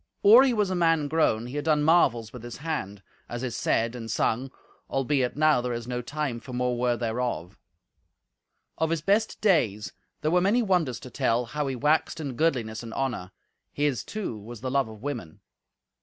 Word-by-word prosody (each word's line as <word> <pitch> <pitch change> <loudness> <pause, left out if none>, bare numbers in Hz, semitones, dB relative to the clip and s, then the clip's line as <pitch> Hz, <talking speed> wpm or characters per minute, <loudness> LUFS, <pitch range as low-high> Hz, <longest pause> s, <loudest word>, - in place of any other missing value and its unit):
Or 225 +6 +9
he 270 - +3
was 210 -5 +1
a - - 0
man 165 -4 +2
grown 140 -8 +1
he 125 +4 -6
had 145 - -3
done 150 -2 +3
marvels 120 -9 +3
with 125 - -8
his 120 0 -8
hand, 105 -11 -4 0.3
as 120 +1 -5
is 125 -3 -3
said 115 +1 +1
and 115 -2 -7
sung, 120 +4 0 0.4
albeit 135 -1 0
now 155 -4 +4
there 125 0 -2
is 120 0 -5
no 125 0 -2
time 140 -1 -3
for 125 +2 -10
more 125 0 0
word 120 0 0
thereof. 115 -7 -2 1.2
Of 160 - +1
his 165 -2 -1
best 205 +4 +1
days 115 - +2 0.3
there 155 - 0
were 180 +1 +4
many 215 +6 +3
wonders 170 - +1
to 125 - -10
tell, 115 +2 +1
how 150 +4 -3
he 135 - -2
waxed 150 +5 +1
in 140 -4 -4
goodliness 120 -8 0
and 115 -1 -8
honour; 125 -9 -2 0.4
his, 145 -4 0
too, 200 - -5
was 115 +2 -10
the 130 0 -3
love 140 -2 +2
of 110 +1 -12
women. 120 - -5
130 Hz, 195 wpm, -27 LUFS, 120-155 Hz, 1.2 s, Or